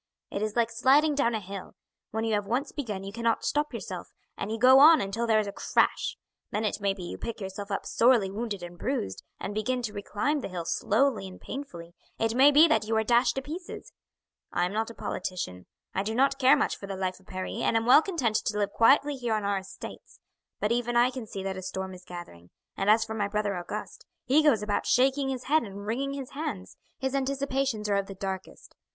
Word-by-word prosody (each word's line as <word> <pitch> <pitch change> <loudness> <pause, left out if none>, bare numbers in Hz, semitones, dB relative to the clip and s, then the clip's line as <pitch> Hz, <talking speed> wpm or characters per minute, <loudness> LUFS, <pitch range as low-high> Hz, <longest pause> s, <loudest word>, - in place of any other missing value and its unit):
It 200 - -3
is 215 0 -2
like 235 -1 +2
sliding 280 +6 +4
down 240 -5 +1
a - - -1
hill; 195 -1 -8 0.3
when 220 +1 -2
you 225 -1 0
have 205 -1 0
once 255 +6 -1
begun 215 -10 -4
you 195 +1 -7
cannot 230 0 0
stop 295 0 0
yourself, - - -6 0.3
and - - -4
you 225 - -2
go 255 +3 +7
on 315 +3 +9
until 210 +4 -2
there 220 -1 +4
is 215 - +2
a 200 - -4
crash; - - +1 0.3
then 215 +1 -1
it 205 0 -2
may 200 -1 +2
be 185 - -8
you 175 - -6
pick 230 - -5
yourself 200 +1 -6
up 200 - -3
sorely 230 -5 +3
wounded 205 -3 -4
and 175 0 -9
bruised, 245 - -2 0.2
and 205 - -4
begin 245 +4 -1
to 215 -3 -3
reclimb 210 +9 -1
the - - -4
hill 180 -3 -5
slowly 220 +3 +1
and 185 - -11
painfully; 175 -12 -8 0.2
it 225 0 0
may 265 +4 +7
be 300 +3 +7
that 220 -8 +1
you 225 0 +1
are 220 - +2
dashed 240 +2 +3
to 270 - -3
pieces. 335 +6 -8 0.6
I 175 - +1
am 180 - -3
not 220 +1 -1
a 230 - -10
politician. 175 - -4 0.3
I 190 - 0
do 220 +3 -3
not 275 +2 +2
care 270 +2 +6
much - - 0
for 200 - -8
the 195 -1 -5
life 185 -1 -2
of 190 - -25
Paris, 185 +2 -5
and 225 - +2
am 225 - 0
well 255 +5 +8
content 270 - 0
to 210 - -2
live 205 -1 0
quietly 280 +6 +4
here 240 -3 -1
on 215 - -2
our 200 -1 0
estates; 190 0 -11 0.4
but 210 - 0
even 240 0 +1
I 245 +2 +5
can 250 -4 -7
see 195 -2 -6
that 190 -1 -3
a - - -5
storm 190 0 -5
is 180 0 -12
gathering; 90 - -10 0.3
and 195 - 0
as 220 +1 +5
for 220 - -5
my 205 -2 -1
brother 205 -1 -1
Auguste, 175 0 -6 0.2
he 280 +5 +4
goes 275 -9 +3
about 210 -1 -1
shaking 270 +2 +3
his 255 -2 -3
head 310 +3 +3
and 200 -1 -8
wringing 270 +6 -2
his 275 -2 -6
hands, 275 -11 -5 0.2
his 265 0 -2
anticipations 270 -4 -1
are 200 -1 +2
of 200 -1 -1
the 195 - -8
darkest. 190 0 -6
220 Hz, 235 wpm, -28 LUFS, 195-260 Hz, 0.6 s, on